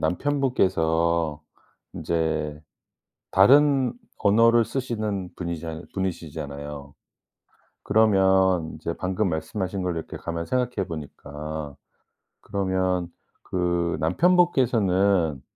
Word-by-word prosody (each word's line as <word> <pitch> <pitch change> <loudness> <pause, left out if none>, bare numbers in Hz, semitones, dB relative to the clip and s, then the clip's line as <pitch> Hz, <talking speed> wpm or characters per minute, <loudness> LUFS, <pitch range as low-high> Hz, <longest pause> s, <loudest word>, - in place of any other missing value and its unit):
남편 140 - 0
분께서 85 - +1 0.5
인제 80 -2 -2 0.7
다른 135 +5 +5 0.3
언어를 115 +3 +4
쓰시는 110 -8 -3
분이잖 85 -1 -5
분이시잖아요. 75 -6 -5 0.9
그러면 95 -5 +3
이제 80 +2 -4
방금 95 +2 -1
말씀하신 90 +4 -3
거를 90 -2 -2
이렇게 80 - -6
가만히 85 0 -5
생각해 125 -5 -1
보니까 75 -1 -7 0.7
그러면 95 -3 -1 0.4
그 85 -2 -1
남편 160 - +3
분께서는 100 - +2
90 Hz, 230 characters per minute, -25 LUFS, 80-105 Hz, 0.9 s, 다른